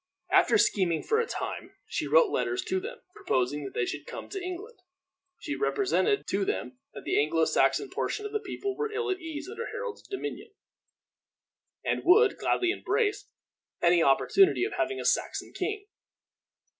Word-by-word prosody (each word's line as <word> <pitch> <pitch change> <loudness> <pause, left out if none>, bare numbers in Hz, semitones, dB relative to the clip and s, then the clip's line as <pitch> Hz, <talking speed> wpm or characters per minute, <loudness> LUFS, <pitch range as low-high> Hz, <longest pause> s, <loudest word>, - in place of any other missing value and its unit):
After - - +5
scheming 175 -5 +2
for 440 0 +2
a 470 - 0
time, - - -5
she - - -3
wrote - - +5
letters 370 0 -1
to 375 0 -1
them, 470 +5 -8
proposing 145 - -1
that 135 - -8
they 120 - +1
should 145 +2 -5
come - - -7
to 390 -1 -5
England. 370 +5 -7 0.6
She 295 - -4
represented 415 0 +1
to 200 +1 +1
them 125 -8 -3 0.2
that - - -8
the - - +2
Anglo 160 +2 +2
Saxon 415 - +2
portion 420 - -3
of 420 - -5
the 430 - 0
people 400 -1 -4
were 440 0 -2
ill 435 -1 -1
at 375 - -2
ease 320 -1 -6
under 460 +4 -5
Harold's - - -5
dominion, 405 +2 -6 1.3
and - - 0
would 395 +5 +5
gladly 360 -1 +1
embrace 415 +2 -1 0.5
any 170 0 +4
opportunity 365 - +4
of 425 - -4
having 395 - -1
a - - -5
Saxon - - 0
king. 405 +2 -3
395 Hz, 170 wpm, -28 LUFS, 295-430 Hz, 1.3 s, After